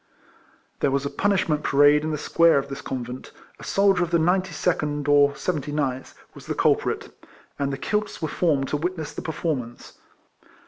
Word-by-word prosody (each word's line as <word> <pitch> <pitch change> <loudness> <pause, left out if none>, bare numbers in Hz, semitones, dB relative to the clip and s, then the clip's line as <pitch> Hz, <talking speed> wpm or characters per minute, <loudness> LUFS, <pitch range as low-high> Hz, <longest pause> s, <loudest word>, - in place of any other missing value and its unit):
There - - +2
was 140 +1 -1
a 140 - -3
punish 200 -1 +1
ment 150 -2 0
parade 145 +1 +4
in 155 - -2
the 155 - -2
square 165 +1 +3
of 140 0 -2
this 140 +1 -6
convent. 125 -2 -6 0.3
A - - -11
soldier 195 -2 +2
of 175 - 0
the 170 - +3
Ninety 180 +3 +1
second 150 -3 -1
or 145 -1 +4
Seventy 150 -5 -3
ninth 135 -3 -3 0.2
was - - -13
the - - -2
culprit, - - 0 0.5
and 140 -1 0
the 135 - -3
kilts 210 +7 -2
were 160 - -2
formed 145 -4 0
to 150 - 0
witness 165 0 -4
the - - -6
performance. 145 -7 -4
150 Hz, 185 wpm, -24 LUFS, 140-170 Hz, 0.5 s, parade